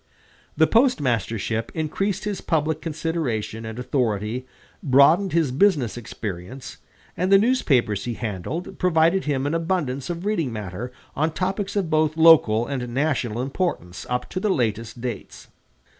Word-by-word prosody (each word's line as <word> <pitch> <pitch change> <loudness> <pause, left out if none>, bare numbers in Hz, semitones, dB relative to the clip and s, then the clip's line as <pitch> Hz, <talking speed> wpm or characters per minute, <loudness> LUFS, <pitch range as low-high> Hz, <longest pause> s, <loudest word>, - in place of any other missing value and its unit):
The 160 - +6
postmastership 115 - +1
increased 170 +5 -1
his 210 -2 -3
public 155 -1 0
consideration 150 -9 -3
and 110 +1 -7
authority, 120 -1 -1 0.3
broadened 155 +8 +5
his 160 -5 +2
business 140 - +2
experience, 110 +1 -7 0.4
and 185 +2 -1
the 195 - +9
newspapers 140 - +2
he 120 -1 -3
handled 115 - -5
provided 170 +1 +3
him 140 -2 0
an 145 - -1
abundance 165 -6 -1
of 175 +2 -4
reading 170 - 0
matter 105 +2 -6 0.2
on 155 +2 0
topics 195 +3 -2
of 190 -6 -1
both 155 0 +2
local 150 -9 +6
and 125 -2 -4
national 125 -4 0
importance 135 - -3
up 125 0 -1
to 185 - -2
the 210 - 0
latest 115 - -1
dates. 120 -4 -6
140 Hz, 140 wpm, -23 LUFS, 115-170 Hz, 0.4 s, the